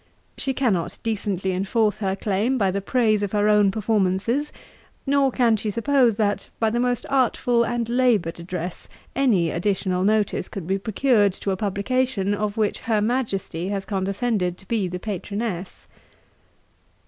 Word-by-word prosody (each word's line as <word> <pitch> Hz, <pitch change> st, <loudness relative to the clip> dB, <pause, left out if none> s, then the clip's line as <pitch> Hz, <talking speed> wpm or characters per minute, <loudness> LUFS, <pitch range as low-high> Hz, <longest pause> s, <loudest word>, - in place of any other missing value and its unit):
She 265 Hz, -1 st, -2 dB
cannot 210 Hz, -11 st, 0 dB
decently 200 Hz, -4 st, -1 dB
enforce 205 Hz, +3 st, 0 dB
her 195 Hz, -2 st, -1 dB
claim 210 Hz, +6 st, 0 dB
by 195 Hz, -5 st, +2 dB
the 200 Hz, +1 st, -2 dB
praise 215 Hz, 0 st, +2 dB
of 205 Hz, -1 st, -3 dB
her 205 Hz, 0 st, +2 dB
own 210 Hz, -1 st, +5 dB
performances; 215 Hz, +6 st, 0 dB, 0.5 s
nor 275 Hz, -1 st, +3 dB
can 235 Hz, -3 st, +3 dB
she 215 Hz, +1 st, -3 dB
suppose, 240 Hz, +1 st, +2 dB
that, 205 Hz, -1 st, -1 dB
by 225 Hz, -1 st, +2 dB
the 240 Hz, -, 0 dB
most 245 Hz, -1 st, 0 dB
artful 245 Hz, -2 st, +2 dB
and 235 Hz, -1 st, -1 dB
laboured 235 Hz, -9 st, +1 dB
address, 175 Hz, 0 st, -6 dB, 0.3 s
any 210 Hz, -12 st, +2 dB
additional 185 Hz, 0 st, 0 dB
notice 210 Hz, 0 st, +1 dB
could 195 Hz, -5 st, -6 dB
be 190 Hz, +3 st, 0 dB
procured 215 Hz, -1 st, +2 dB
to 195 Hz, -, -3 dB
a -, -, 0 dB
publication, 205 Hz, +1 st, 0 dB
of 210 Hz, 0 st, -2 dB
which 215 Hz, -2 st, 0 dB
Her 220 Hz, -2 st, 0 dB
MAJESTY 205 Hz, -7 st, -1 dB
has 195 Hz, -1 st, -3 dB
condescended 195 Hz, -1 st, -1 dB
to 190 Hz, -, -18 dB
be 215 Hz, -5 st, 0 dB
the 180 Hz, 0 st, -4 dB
PATRONESS.' 200 Hz, -1 st, -4 dB
210 Hz, 155 wpm, -23 LUFS, 190-235 Hz, 0.5 s, own